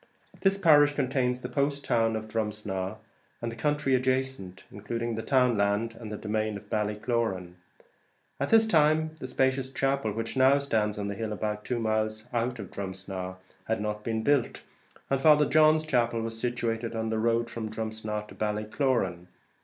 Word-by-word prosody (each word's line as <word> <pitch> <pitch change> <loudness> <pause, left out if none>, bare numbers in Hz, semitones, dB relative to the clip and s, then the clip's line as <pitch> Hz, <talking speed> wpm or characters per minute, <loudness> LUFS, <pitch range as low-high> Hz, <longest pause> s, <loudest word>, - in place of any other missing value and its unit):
This 195 0 +3
parish 145 -5 +5
contains 125 -2 0
the 125 - -4
post 140 +2 -1
town 115 -1 +2
of 110 0 -4
Drumsna 105 -3 -3 0.4
and 115 0 -3
the - - -8
country 145 +2 0
adjacent, 130 -7 -1
including 115 +3 -4
the 110 - -3
town 125 -1 +3
land 100 +3 +1
and 110 -3 -7
demesne 110 0 -2
of - - -15
Ballycloran. 105 -3 -1 0.9
At 140 - -1
this 225 0 +6
time 155 -5 +3
the 130 - -5
spacious 130 0 0
chapel 135 -4 0
which 115 +4 -4
now 130 +1 +5
stands 110 -7 0
on 100 -1 -3
the 100 - -2
hill 110 +1 -4
about 105 0 -3
two 125 - -1
miles 110 -1 -1
out 120 +1 0
of 100 -4 -8
Drumsna 95 -1 -5 0.3
had 110 - -1
not 105 0 -3
been 110 0 -2
built, 140 -2 +1 0.5
and 135 -1 +2
Father 150 0 +6
John's 155 +1 +4
chapel 120 -5 +1
was 115 0 -3
situated 115 -1 -2
on 110 0 -2
the 110 - 0
road 115 +1 +1
from 115 -1 -5
Drumsna 110 -1 -4
to - - -11
Ballycloran. 105 -3 -1
115 Hz, 170 wpm, -28 LUFS, 105-130 Hz, 0.9 s, this